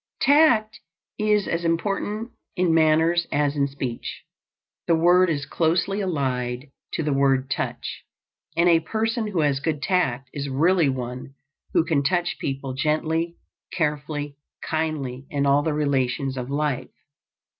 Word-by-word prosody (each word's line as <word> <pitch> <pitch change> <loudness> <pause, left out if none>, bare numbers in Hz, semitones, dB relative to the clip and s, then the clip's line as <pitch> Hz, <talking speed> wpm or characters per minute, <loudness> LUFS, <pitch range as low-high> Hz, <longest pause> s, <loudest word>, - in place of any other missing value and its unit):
Tact 245 -7 +4 0.4
is 210 -2 +2
as 165 +1 -1
important 200 +6 -1 0.2
in 180 -2 +2
manners 160 +2 +3
as 145 0 +1
in 140 -1 +2
speech. 135 -4 -5 0.6
The 170 - +4
word 175 +2 +5
is 145 -3 -1
closely 175 +7 0
allied 130 -6 -2 0.2
to - - -1
the 150 -1 0
word 135 -1 +2
touch, 130 - -3 0.5
and 170 +1 +4
a 170 -1 +6
person 225 +6 -1
who 190 -6 0
has 145 -2 +2
good 150 +1 -1
tact 135 -8 0
is 140 -1 -4
really 165 +3 +3
one 130 +1 -5 0.4
who 165 - +4
can 155 -3 +2
touch 175 +5 0
people 135 -1 -3
gently, 160 +4 0 0.4
carefully, 145 -2 -2 0.3
kindly, 145 -5 -2
in 140 -1 0
all 140 +1 +4
the 155 - -1
relations 135 -2 0
of 125 0 -5
life. 145 -2 -1
150 Hz, 140 wpm, -24 LUFS, 140-175 Hz, 0.6 s, a